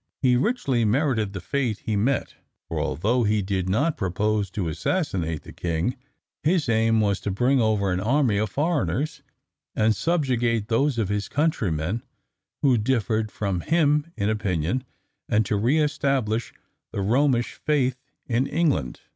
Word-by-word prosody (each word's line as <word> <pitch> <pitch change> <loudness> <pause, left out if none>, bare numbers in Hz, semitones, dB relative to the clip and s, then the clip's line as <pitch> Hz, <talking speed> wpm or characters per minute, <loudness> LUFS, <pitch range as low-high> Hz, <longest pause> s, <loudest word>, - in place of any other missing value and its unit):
He 125 -1 +5
richly 135 - +1
merited 110 -2 +1
the 95 - -4
fate 115 +3 -2
he 110 - 0
met, 120 +6 0 0.3
for - - -3
although 115 +8 0
he 105 -1 +1
did 95 -1 -1
not 145 - +1
propose 105 +2 0
to 95 -1 -3
assassinate 85 - -1
the - - -11
king, 85 +8 -1 0.5
his 160 0 +1
aim 115 -1 +3
was 100 -2 +1
to - - -3
bring 125 +7 +2
over 105 -3 +1
an 90 - 0
army 115 0 +2
of 110 0 0
foreigners, 150 - -1 0.5
and 110 0 +3
subjugate 120 -9 0
those 135 +3 +2
of 110 -4 0
his 105 -1 -2
countrymen 110 - 0 0.6
who 130 -5 +4
differed 110 -2 0
from 100 -2 -2
him 150 - +2
in 100 - 0
opinion, 105 +1 -1 0.5
and 110 0 +3
to 105 - 0
re 120 +9 +2
establish 135 -7 0 0.4
the 100 - -3
Romish 120 +3 +2
faith 130 -4 0 0.2
in 125 +2 0
England. 145 - 0
115 Hz, 150 wpm, -24 LUFS, 100-140 Hz, 0.6 s, He